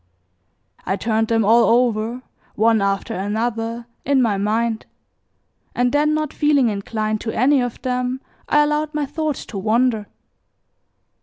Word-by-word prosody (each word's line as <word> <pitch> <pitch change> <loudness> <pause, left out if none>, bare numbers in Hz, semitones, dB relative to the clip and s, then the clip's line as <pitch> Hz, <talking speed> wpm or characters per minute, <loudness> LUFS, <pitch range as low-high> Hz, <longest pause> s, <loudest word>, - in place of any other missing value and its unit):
I 190 - -1
turned 220 +1 0
them 225 -2 +2
all 230 +3 +5
over, 235 0 +1 0.3
one 225 0 +3
after 195 0 -1
another, 225 +4 -2 0.2
in 280 -1 +2
my 225 -5 +2
mind, 220 +3 -1 0.9
and 245 0 +2
then 300 +2 +2
not 310 -2 -2
feeling 290 -5 +3
inclined 215 +1 -2
to 225 - -3
any 270 +3 +3
of 245 -2 -4
them 250 0 -1 0.3
I 295 0 +5
allowed 300 +1 -1
my 300 -1 0
thoughts 300 0 -3
to 200 - -6
wander. 220 +1 +1
235 Hz, 140 wpm, -20 LUFS, 215-265 Hz, 0.9 s, all